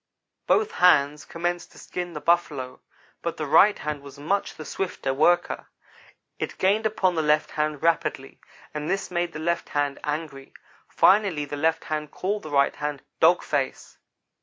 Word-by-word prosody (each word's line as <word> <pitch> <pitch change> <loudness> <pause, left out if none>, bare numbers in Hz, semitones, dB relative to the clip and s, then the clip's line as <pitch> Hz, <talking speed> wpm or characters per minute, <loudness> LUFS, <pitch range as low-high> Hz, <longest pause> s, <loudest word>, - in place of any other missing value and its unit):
"Both 430 +1 +3
hands 150 -5 +4
commenced 175 +1 -3
to - - -17
skin 175 -1 -6
the 150 - -5
Buffalo, 150 -6 0 0.4
but 170 - -3
the 155 - -3
right 165 +8 +5
hand 150 -1 -4
was 140 0 -12
much 195 +8 -1
the 155 - -9
swifter 175 -8 -3
worker. 175 +5 +2 0.7
It - - -4
gained 210 +4 +2
upon 190 -4 +1
the 160 - 0
left 150 0 +2
hand 150 -1 -2
rapidly, 165 -5 0 0.3
and 150 0 -4
this 195 -1 -2
made 175 -1 -1
the - - -7
left 170 +2 -1
hand 145 -1 -1
angry. 150 -3 -5 0.3
Finally 190 -7 +3
the 145 - -6
left 160 +2 +1
hand 150 -1 -3
called 205 +7 -2
the 155 - -8
right 140 -1 +2
hand 145 -1 -4 0.2
'dog - - +5
face.' - - -3
155 Hz, 165 wpm, -25 LUFS, 145-175 Hz, 0.7 s, right